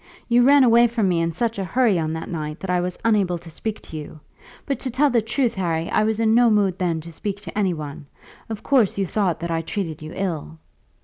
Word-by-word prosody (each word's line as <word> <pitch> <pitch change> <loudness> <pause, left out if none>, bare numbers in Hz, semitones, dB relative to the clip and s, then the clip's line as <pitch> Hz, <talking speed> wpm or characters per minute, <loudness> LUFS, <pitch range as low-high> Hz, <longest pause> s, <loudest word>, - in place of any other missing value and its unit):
"You 240 0 +4
ran 275 +2 +6
away 235 0 +6
from 225 -3 0
me 170 -2 +1
in 165 0 0
such 225 +5 -2
a - - -1
hurry 220 -1 +2
on 160 0 -2
that 160 - -5
night 155 -2 -5
that 190 - -3
I 180 -1 +2
was 180 0 -3
unable 200 -6 +2
to 165 -1 -12
speak 215 +6 -4
to 160 - -9
you. 155 0 -9 0.5
But 275 -3 -2
to 260 - -3
tell 275 +4 +2
the 235 -2 +3
truth, 240 +2 0
Harry, 170 -3 -2
I 215 - +2
was 220 0 0
in 220 -1 +3
no 240 0 +5
mood 200 -4 +2
then 170 -3 0
to 170 +2 -10
speak 200 +4 -4
to - - -8
any 195 -4 +1
one. 150 -2 -8 0.4
Of 220 -2 -6
course 250 -10 +2
you 195 - +1
thought 185 -2 0
that 170 0 -3
I 165 0 0
treated 165 -3 -4
you 155 +1 -8
ill." 165 -4 -4
195 Hz, 250 wpm, -22 LUFS, 165-230 Hz, 0.5 s, ran